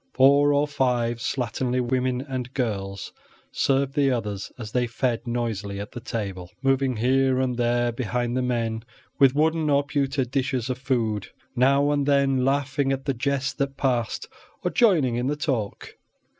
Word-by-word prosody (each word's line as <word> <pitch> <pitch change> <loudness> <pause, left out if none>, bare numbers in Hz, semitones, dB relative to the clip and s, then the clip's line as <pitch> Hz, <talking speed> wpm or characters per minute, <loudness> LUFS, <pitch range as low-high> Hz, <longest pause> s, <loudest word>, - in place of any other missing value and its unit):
Four 140 +2 +5
or 145 +1 +2
five 125 -4 0
slatternly 125 +1 -1
women 125 0 0
and 130 -3 -5
girls 100 -6 -3 0.4
served 135 0 +1
the 140 -2 +3
others 105 -6 -3
as 110 -4 -7
they 125 0 +1
fed 115 0 -2
noisily 110 -4 -2
at 105 +4 -6
the 120 - -7
table, 100 -6 -5
moving 135 -1 +2
here 130 +2 +2
and 130 -1 0
there 120 0 +1
behind 120 +1 -2
the 130 - +1
men 115 -3 -1 0.4
with 135 -1 +5
wooden 160 +1 +2
or 140 0 +3
pewter 140 -2 0
dishes 130 -1 -1
of 125 - -4
food, 115 -6 -1 0.3
now 140 +3 +3
and 145 -1 0
then 140 -2 +3
laughing 135 0 +1
at 135 0 -2
the 140 - +1
jests 130 +1 -1
that 135 0 -3
passed 120 -5 -1 0.4
or - - 0
joining 155 - +3
in 125 +1 -1
the 145 - 0
talk. 130 -8 -3
130 Hz, 165 wpm, -25 LUFS, 120-135 Hz, 0.4 s, Four